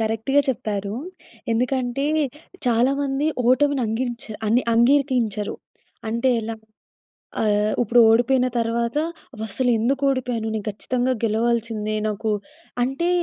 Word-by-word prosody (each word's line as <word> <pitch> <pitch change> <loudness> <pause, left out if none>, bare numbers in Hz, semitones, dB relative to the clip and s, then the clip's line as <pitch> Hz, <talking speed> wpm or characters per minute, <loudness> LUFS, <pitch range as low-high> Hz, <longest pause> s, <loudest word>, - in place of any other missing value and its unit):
కరెక్ట్‌గా 225 +6 +1
చెప్పారు. 205 -5 -2 0.6
ఎందుకంటే 250 +2 0 0.6
చాలా 240 +2 +3
మంది 275 +1 0 0.2
ఓటమిని 280 +1 +3
అంగించా 235 0 -3
అన్ని 235 +4 +3
అంగీకరించరు. 235 -4 +2 0.5
అంటే 235 +3 +1
ఎలా? 225 +1 -4 0.9
ఆహ్, 210 0 +2
ఇప్పుడు 240 +1 +3
ఓడిపోయిన 250 +3 +3
తర్వాత 235 +1 -1 0.4
అవస్సలు 220 +3 -1
ఎందుకు 265 +5 0
ఓడిపోయాను. 250 -4 -1
నేను 215 - -4
ఖచ్చితంగా 250 +5 -1
గెలవాల్సిందే. 225 -1 0
నాకు 215 +1 -2 0.5
అంటే 270 +8 -1
235 Hz, 105 wpm, -22 LUFS, 220-255 Hz, 0.9 s, చాలా